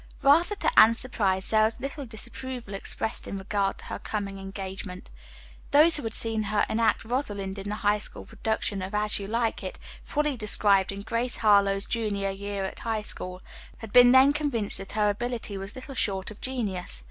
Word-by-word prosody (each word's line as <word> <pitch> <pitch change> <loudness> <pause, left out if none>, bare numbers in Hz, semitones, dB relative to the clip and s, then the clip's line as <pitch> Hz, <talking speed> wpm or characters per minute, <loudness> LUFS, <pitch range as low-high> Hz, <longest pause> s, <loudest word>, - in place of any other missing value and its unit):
Rather 330 +9 +5
to 485 - +3
Anne's 230 +1 +7
surprise, 195 -7 -1
there 215 -1 +5
was 220 +1 0
little 275 0 -5
disapproval 235 0 -7
expressed 195 +2 -3
in 195 - -4
regard 195 0 -1
to - - -12
her - - -5
coming 200 -2 -4
engagement. 195 -1 -7 0.6
Those 310 +3 +6
who - - -4
had 225 -3 -1
seen 225 -1 +1
her 210 0 +1
enact 225 0 +1
"Rosalind" 205 -6 -3
in 200 +1 -5
the 210 - -2
High 210 -1 +1
School - - -7
production 220 -2 -2
of 190 +3 -4
"As 210 0 +1
You 200 - -5
Like 230 +1 -1
It," - - -6 0.3
fully 300 -1 0
described 205 -3 +3
in 200 0 -6
"Grace 230 +3 -2
Harlowe's 200 -2 +4
Junior 205 -4 -1
Year 200 0 -4
at 190 - -6
High 220 -2 -2
School," 185 -3 -5 0.3
had 225 -3 -10
been 245 0 +8
then 265 +2 +7
convinced 280 -8 -2
that 195 - -8
her 210 0 +2
ability 230 0 -2
was 195 +1 -6
little 265 +2 -8
short 195 -5 -2
of 210 - -13
genius. 205 - -2
215 Hz, 190 wpm, -27 LUFS, 195-240 Hz, 0.6 s, been